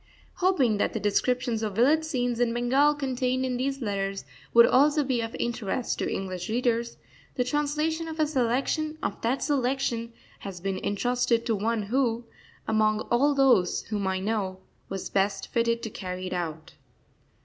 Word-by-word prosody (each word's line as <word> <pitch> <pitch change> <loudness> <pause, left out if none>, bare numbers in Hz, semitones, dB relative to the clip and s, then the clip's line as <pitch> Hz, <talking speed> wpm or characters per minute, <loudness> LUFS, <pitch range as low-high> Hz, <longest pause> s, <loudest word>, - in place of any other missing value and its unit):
Hoping 305 - +2
that - - +1
the - - -2
descriptions 240 +2 0
of 210 -3 -3
village 290 +8 +4
scenes 245 -6 -1
in 235 -1 +1
Bengal 270 +5 +3
contained 260 -2 -1
in 250 -1 -1
these 270 +1 -2
letters 195 -3 -2 0.3
would 235 0 +8
also 295 +3 +4
be 255 -3 0
of 225 0 -5
interest 235 0 -2
to - - -1
English 185 -1 -4
readers, 235 0 0 0.4
the 250 - +1
translation 300 +4 -1
of 320 0 -7
a 310 - +4
selection 290 +3 0
of - - -3
that 250 +4 0
selection 255 -4 0 0.3
has 195 -3 -7
been 190 +1 -3
entrusted 235 +2 +1
to 230 -2 +1
one 220 +2 -1
who, 235 +1 0 0.4
among 215 -1 +2
all 280 +4 +3
those 255 -10 +3
whom 205 -3 -1
I 190 0 0
know, 195 -2 -2 0.3
was 195 -1 -4
best 195 0 0
fitted 235 0 0
to 225 - -4
carry 185 -2 -5
it 185 - -4
out. 165 -3 -4
235 Hz, 165 wpm, -27 LUFS, 205-270 Hz, 0.4 s, would